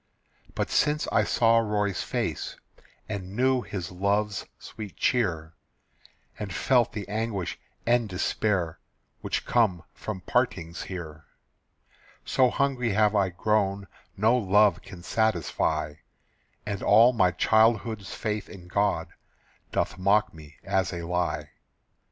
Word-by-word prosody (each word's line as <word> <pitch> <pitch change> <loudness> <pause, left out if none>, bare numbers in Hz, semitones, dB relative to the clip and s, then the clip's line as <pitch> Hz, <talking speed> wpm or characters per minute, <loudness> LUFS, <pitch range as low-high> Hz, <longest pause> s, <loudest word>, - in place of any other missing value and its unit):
But - - -2
since 150 +1 +2
I - - +3
saw 115 -1 +4
Roy's 105 -3 0
face, - - -3 0.5
And 100 -2 -6
knew 130 +1 +2
his 95 -7 -6
love's 100 +2 -1
sweet 105 -4 -9
cheer, 85 -10 0 0.9
And 105 -2 -4
felt 120 +6 +2
the 105 -2 -5
anguish 105 -4 -3 0.3
and 120 -2 +2
despair 90 -2 -1 0.4
Which - - -3
come 100 -8 +2
from 105 -4 -6
partings 90 -8 -1
here, 80 -5 -7 1.0
So 130 -1 +3
hungry 125 -4 0
have 105 0 +3
I 100 -2 +3
grown 100 +1 0 0.3
No 110 +5 +4
love 105 -2 +3
can 90 -3 -12
satisfy, 80 -8 0 0.7
And 100 -2 -3
all 115 +5 +6
my 95 -6 +4
childhood's 110 +1 +2
faith 105 -2 -3
in 90 -4 -11
God 100 +2 0 0.6
Doth - - -1
mock 105 +3 +3
me 75 -2 -13
as 95 -2 0
a 85 -1 -5
lie. 90 0 -2
105 Hz, 120 wpm, -27 LUFS, 90-110 Hz, 1.0 s, all